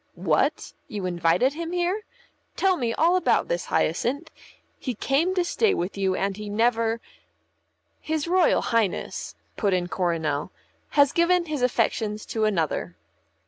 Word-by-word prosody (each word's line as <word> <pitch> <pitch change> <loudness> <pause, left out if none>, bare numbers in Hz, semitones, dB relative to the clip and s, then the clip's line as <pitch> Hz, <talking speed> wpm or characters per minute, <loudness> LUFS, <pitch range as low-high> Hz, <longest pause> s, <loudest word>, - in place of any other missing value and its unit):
"What? - - 0
You 210 -8 -5
invited 175 +8 +2
him 335 +2 -5
here? 360 +4 -1 0.5
Tell 385 -1 +3
me 240 -8 -1
about 355 +7 +3
this, - - -1
Hyacinth. 285 +7 -1 0.5
He 255 -3 -4
came 310 - +1
to 360 -2 +1
stay 420 +4 +2
with 180 +3 -3
you 190 -2 0
and 195 +1 -1
he 210 -1 -6
never 230 +1 +1 0.5
" - - -47
"His 315 0 0
Royal 360 -1 +3
Highness," 225 -5 -1 0.2
put 200 -4 +2
in 175 -1 -1
Coronel, 160 -6 -1 0.5
"has 285 -1 +6
given 345 +1 +3
his 305 -4 -3
affections 225 -3 0
to 220 -1 +1
another." 160 - -1
235 Hz, 145 wpm, -25 LUFS, -, 0.5 s, has